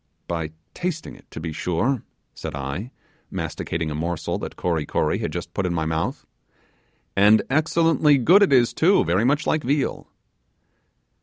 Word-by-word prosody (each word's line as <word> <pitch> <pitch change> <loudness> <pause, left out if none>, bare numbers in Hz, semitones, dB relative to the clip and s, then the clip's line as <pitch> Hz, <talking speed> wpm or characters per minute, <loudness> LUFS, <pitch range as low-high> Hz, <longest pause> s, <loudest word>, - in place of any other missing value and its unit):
'By 80 -3 -2 0.2
tasting 175 -2 -4
it, - - -19
to - - -8
be 80 0 -5
sure,' 110 - 0 0.3
said 80 -2 -6
I, 70 - -4 0.4
masticating 80 -1 -3
a - - -2
morsel 80 +2 -2
that - - -6
Kory 85 -4 -1
Kory - - 0
had - - -2
just - - -6
put 95 - -1
in 85 - -1
my 80 -1 0
mouth, 80 +1 -2 0.9
'and 105 +2 +6
excellently 155 0 +3
good 175 - +5
it 200 - +4
is, 125 -3 +4
too, 190 +5 +4
very 95 +7 +1
much 145 +4 +2
like 155 - +1
veal. 140 +1 -1
105 Hz, 160 wpm, -23 LUFS, -, 0.9 s, and